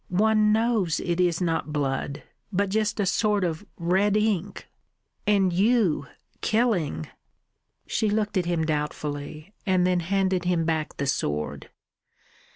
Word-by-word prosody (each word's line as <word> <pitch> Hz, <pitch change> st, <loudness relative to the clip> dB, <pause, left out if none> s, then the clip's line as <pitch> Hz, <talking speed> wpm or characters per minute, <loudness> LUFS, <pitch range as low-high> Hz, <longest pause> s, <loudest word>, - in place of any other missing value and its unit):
One 215 Hz, +3 st, +3 dB
knows 220 Hz, -7 st, +1 dB
it 175 Hz, 0 st, -2 dB
is 175 Hz, -2 st, +2 dB
not 165 Hz, -3 st, -1 dB
blood, 140 Hz, -1 st, -2 dB, 0.3 s
but 200 Hz, 0 st, +1 dB
just 215 Hz, +1 st, 0 dB
a 200 Hz, -, +2 dB
sort 210 Hz, +1 st, +1 dB
of 165 Hz, 0 st, -2 dB
red 190 Hz, +4 st, +2 dB
ink.... 205 Hz, -3 st, -1 dB, 0.6 s
And 195 Hz, -3 st, +3 dB
you 190 Hz, -, +2 dB, 0.3 s
killing!" 190 Hz, -, +1 dB, 0.8 s
She 215 Hz, -, 0 dB
looked 210 Hz, 0 st, 0 dB
at 180 Hz, -2 st, +1 dB
him 170 Hz, -2 st, 0 dB
doubtfully, 150 Hz, +2 st, -4 dB
and 185 Hz, -2 st, +2 dB
then 180 Hz, -1 st, +2 dB
handed 185 Hz, 0 st, 0 dB
him 175 Hz, -2 st, +1 dB
back 160 Hz, -2 st, -2 dB
the 140 Hz, -, -1 dB
sword. 75 Hz, -, -2 dB
180 Hz, 135 wpm, -26 LUFS, 160-210 Hz, 0.8 s, One